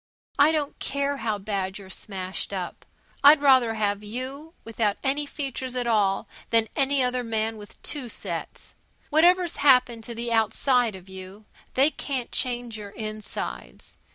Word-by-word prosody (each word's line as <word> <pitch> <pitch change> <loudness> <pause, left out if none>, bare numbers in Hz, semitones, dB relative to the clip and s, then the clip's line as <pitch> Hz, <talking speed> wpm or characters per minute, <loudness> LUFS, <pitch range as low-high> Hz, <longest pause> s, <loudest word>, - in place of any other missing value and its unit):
I 290 +2 +7
don't 300 -3 -2
care 280 0 -1
how 225 -3 -1
bad 195 -1 -3
you're 190 -2 -10
smashed 190 -1 -5
up. 185 -3 -5 0.4
I'd 290 +2 +9
rather 260 -5 +5
have 205 -1 0
you 265 +9 -6
without 225 -2 0
any 285 +2 0
features 265 -3 -4
at 250 -1 -1
all 205 -4 +2 0.2
than 225 -1 +3
any 275 -1 +2
other 250 0 0
man 225 -1 -1
with 205 -1 -12
two 265 -5 -1
sets. - - -5 0.4
Whatever's 345 +3 +4
happened 250 -5 +4
to 235 - -7
the 235 0 -2
outside 225 +1 +2
of 185 0 -12
you, 190 +2 -10 0.3
they 275 +4 +5
can't 265 -6 -4
change 240 -3 -1
your 205 -1 -7
insides. 215 - -5
235 Hz, 155 wpm, -26 LUFS, 210-275 Hz, 0.4 s, I'd